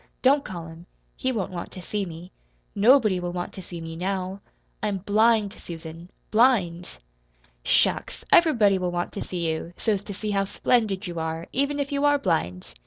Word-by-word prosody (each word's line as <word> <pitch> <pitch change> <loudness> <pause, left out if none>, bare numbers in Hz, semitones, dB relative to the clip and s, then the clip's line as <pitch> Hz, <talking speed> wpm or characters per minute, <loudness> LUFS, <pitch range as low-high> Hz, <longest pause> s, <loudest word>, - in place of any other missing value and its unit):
Don't 275 +2 +5
call 175 -5 -6
him. 165 +2 -12 0.3
He 260 - -1
won't 210 -7 -2
want 175 -2 -5
to - - -8
see 205 0 -2
me. 170 +2 -9 0.4
Nobody 215 -3 +5
will 175 0 -3
want 175 0 -4
to 190 - -8
see 175 -1 -8
me 165 0 -7
now. 190 +2 -3 0.4
I'm 210 -2 0
blind, 210 +1 +3
Susan 165 -1 -9 0.2
blind!" 200 -8 +2 0.7
"Shucks! - - +1
Everybody 225 - +5
will 180 -1 -1
want 175 0 -2
to - - -6
see 175 -2 -3
you, 160 +2 -3
so's 205 -3 0
to 205 - -6
see 210 +1 -3
how 195 -1 +1
splendid 210 -1 +1
you 170 -2 -4
are, 160 +1 -3
even 280 +2 0
if 280 0 -2
you 280 0 0
are 290 0 +5
blind. 160 - -2
190 Hz, 180 wpm, -25 LUFS, 175-220 Hz, 0.7 s, Don't